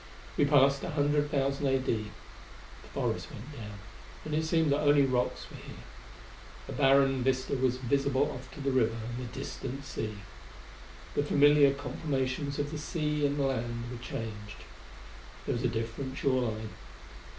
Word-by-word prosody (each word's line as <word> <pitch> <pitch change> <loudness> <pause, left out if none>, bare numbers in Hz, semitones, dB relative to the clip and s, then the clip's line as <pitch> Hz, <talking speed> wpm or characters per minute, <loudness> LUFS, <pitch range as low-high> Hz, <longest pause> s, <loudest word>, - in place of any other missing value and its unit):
We 145 - +4
passed 140 -1 +5
100,000 145 -2 +1
A.D. 125 -5 0 0.7
The - - -15
forest - - -2
went 125 +8 -9
down, 105 -7 -8 0.5
and 155 - -4
it 160 +1 +1
seemed 160 -2 +2
that 140 - +3
only 145 -1 +5
rocks 125 -2 0
were - - -9
here. - - -10 0.8
A - - -6
barren 135 -1 +4
vista 130 +1 +1
was 130 -1 +1
visible 135 +1 +1
off 130 +1 -8
to 145 - -7
the 140 0 0
river 115 -3 +2
and 115 +2 -5
the 120 - -7
distant 135 +1 -5
sea. 110 -4 -4 1.0
The - - +2
familiar 145 0 +6
conformations 140 -1 -2
of 145 0 -2
the 155 - -4
sea 150 -2 0
and 145 +1 -2
the 140 - +1
land 120 -3 -1
were 125 - -5
changed. 105 -4 -6 0.8
There - - 0
was 120 - -2
a - - +4
different 120 +3 -3
shore 130 -3 +2
line. 110 0 -5
135 Hz, 160 wpm, -30 LUFS, 125-145 Hz, 1.0 s, familiar